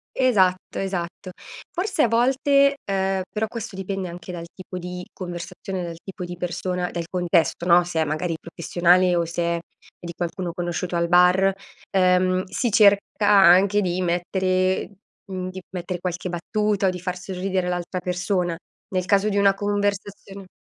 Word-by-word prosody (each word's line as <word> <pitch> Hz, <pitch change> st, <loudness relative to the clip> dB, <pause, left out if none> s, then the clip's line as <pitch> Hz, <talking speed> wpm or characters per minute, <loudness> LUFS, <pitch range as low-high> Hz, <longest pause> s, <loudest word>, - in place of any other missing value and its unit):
Esatto, 190 Hz, -8 st, +2 dB
esatto, 185 Hz, -1 st, -4 dB, 0.4 s
forse 375 Hz, -2 st, -1 dB
a -, -, +4 dB
volte, 275 Hz, +4 st, +3 dB
uhm, 195 Hz, -1 st, 0 dB
però 220 Hz, +1 st, -1 dB
questo 225 Hz, -3 st, -7 dB
dipende 190 Hz, -1 st, -4 dB
anche 175 Hz, +1 st, -8 dB
dal 170 Hz, -1 st, -6 dB
tipo 185 Hz, -1 st, -8 dB
di 180 Hz, 0 st, -6 dB
conversazione, 180 Hz, +1 st, -6 dB
dal 170 Hz, -1 st, -5 dB
tipo 190 Hz, -2 st, -7 dB
di 175 Hz, 0 st, -7 dB
persona, 180 Hz, +1 st, -3 dB
del 170 Hz, -1 st, -4 dB
contesto, 175 Hz, -2 st, +1 dB
no, 175 Hz, 0 st, +5 dB
se 165 Hz, -2 st, -1 dB
è -, -, +4 dB
magari 155 Hz, +3 st, -2 dB
professionale 175 Hz, +2 st, +2 dB
o 170 Hz, -, +2 dB
se 170 Hz, +1 st, -3 dB
è 170 Hz, 0 st, 0 dB, 0.4 s
di 170 Hz, -1 st, -7 dB
qualcuno 175 Hz, +1 st, -4 dB
conosciuto 175 Hz, 0 st, -3 dB
al 170 Hz, 0 st, +1 dB
bar, 180 Hz, +2 st, +5 dB, 0.4 s
uhm, 185 Hz, 0 st, +3 dB
si 230 Hz, +5 st, -2 dB
cerca 205 Hz, 0 st, +4 dB
anche 195 Hz, +1 st, +6 dB
di 185 Hz, -2 st, -1 dB
mettere, 185 Hz, +2 st, 0 dB, 0.3 s
mhmm, 185 Hz, -1 st, -4 dB
di 190 Hz, 0 st, -8 dB
mettere 180 Hz, 0 st, -5 dB
qualche 180 Hz, 0 st, -3 dB
battuta 200 Hz, +3 st, 0 dB
o -, -, +4 dB
di 180 Hz, 0 st, -4 dB
far 180 Hz, 0 st, -4 dB
sorridere 185 Hz, 0 st, -2 dB
l'altra 180 Hz, +1 st, -3 dB
persona, 180 Hz, -1 st, -1 dB, 0.3 s
nel 185 Hz, -1 st, -1 dB
caso 200 Hz, +2 st, +3 dB
di 205 Hz, -, -1 dB
una 200 Hz, -1 st, +5 dB
conversazione... 205 Hz, -1 st, -3 dB
185 Hz, 160 wpm, -23 LUFS, 175-195 Hz, 0.4 s, anche